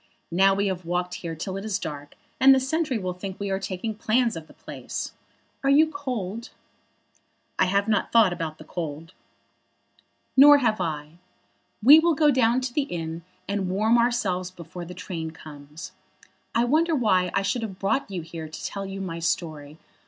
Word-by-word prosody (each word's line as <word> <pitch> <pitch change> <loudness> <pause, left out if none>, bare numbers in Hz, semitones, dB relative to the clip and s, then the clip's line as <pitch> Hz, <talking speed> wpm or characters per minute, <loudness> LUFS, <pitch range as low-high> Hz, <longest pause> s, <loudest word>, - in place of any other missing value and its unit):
Now 195 +3 +4
we 200 +1 0
have 185 -2 -2
walked 180 +1 -2
here 165 -2 -5
till 185 +4 -5
it 195 - -6
is 215 -2 -1
dark, 145 -6 -7 0.2
and 270 0 +8
the - - +3
sentry 270 0 -1
will 185 -3 -3
think 190 +1 -7
we 200 -1 -3
are 190 - 0
taking 195 +3 -4
plans 230 +2 +1
of 160 -1 -8
the - - -17
place. - - -6 0.5
Are 275 - +2
you 310 +3 +5
cold?" 235 -7 -4 1.1
"I - - +5
have 200 +2 +1
not 210 -3 +1
thought 220 -6 +5
about 165 -3 -5
the - - -11
cold." 160 0 -6 1.2
"Nor 290 +2 +9
have 225 -6 +1
I. 155 +1 -4 0.6
We 290 +7 +10
will 335 0 +2
go 295 0 +4
down 250 -1 +3
to 250 -1 -4
the 285 0 0
inn 165 -1 -4 0.3
and 200 -2 -1
warm 215 +5 +3
ourselves 205 -7 0
before 175 -1 -9
the 180 +1 -9
train 165 -3 -5
comes. 155 +2 -11 0.6
I 235 +1 +3
wonder 320 +5 +2
why 185 -8 +2
I 195 - +2
should 200 +5 -1
have 205 -5 -5
brought 200 +6 0
you 185 -4 -4
here 160 -1 -8
to 155 - -8
tell 195 -1 -4
you 195 0 -6
my 170 -3 -4
story. 155 -3 -3
195 Hz, 185 wpm, -25 LUFS, 170-235 Hz, 1.2 s, We